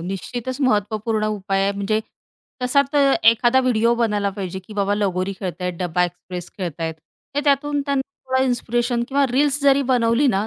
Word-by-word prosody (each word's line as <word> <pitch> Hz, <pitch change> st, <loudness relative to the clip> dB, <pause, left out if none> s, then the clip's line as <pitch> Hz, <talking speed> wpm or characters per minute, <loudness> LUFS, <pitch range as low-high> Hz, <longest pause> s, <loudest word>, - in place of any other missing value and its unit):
निश्चितच 240 Hz, -, -5 dB
महत्त्वपूर्ण 215 Hz, -2 st, 0 dB
उपाय 195 Hz, 0 st, -1 dB
आहे. 200 Hz, +1 st, +1 dB
म्हणजे 200 Hz, +2 st, -1 dB, 0.6 s
तसा 280 Hz, +3 st, +4 dB
तर 280 Hz, -2 st, +4 dB, 0.2 s
एखादा 240 Hz, +3 st, +3 dB
व्हिडिओ 235 Hz, -2 st, +2 dB
बनयला 210 Hz, -4 st, 0 dB
पाहिजे, 190 Hz, -1 st, -5 dB
की 190 Hz, +3 st, -13 dB
बाबा 200 Hz, 0 st, +1 dB
लगोरी 195 Hz, -2 st, -1 dB
खेळत 185 Hz, -2 st, -5 dB
आहेत, 180 Hz, 0 st, -1 dB
डब्बा 180 Hz, 0 st, +1 dB
एक्सप्रेस 175 Hz, 0 st, -7 dB
खेळत 175 Hz, -3 st, -5 dB
आहेत. 160 Hz, -1 st, -2 dB, 0.4 s
हे 290 Hz, -, +1 dB
त्यातून 290 Hz, +1 st, +2 dB
त्यांना 280 Hz, -1 st, +1 dB, 0.3 s
थोडं 260 Hz, 0 st, +2 dB
इन्स्पिरेशन 240 Hz, -1 st, 0 dB
किंवा 280 Hz, 0 st, +2 dB
रील्स 285 Hz, +2 st, +2 dB
जरी 280 Hz, 0 st, +4 dB
बनवली 245 Hz, +1 st, +2 dB
ना 200 Hz, +3 st, 0 dB
220 Hz, 170 wpm, -21 LUFS, 195-260 Hz, 0.6 s, तसा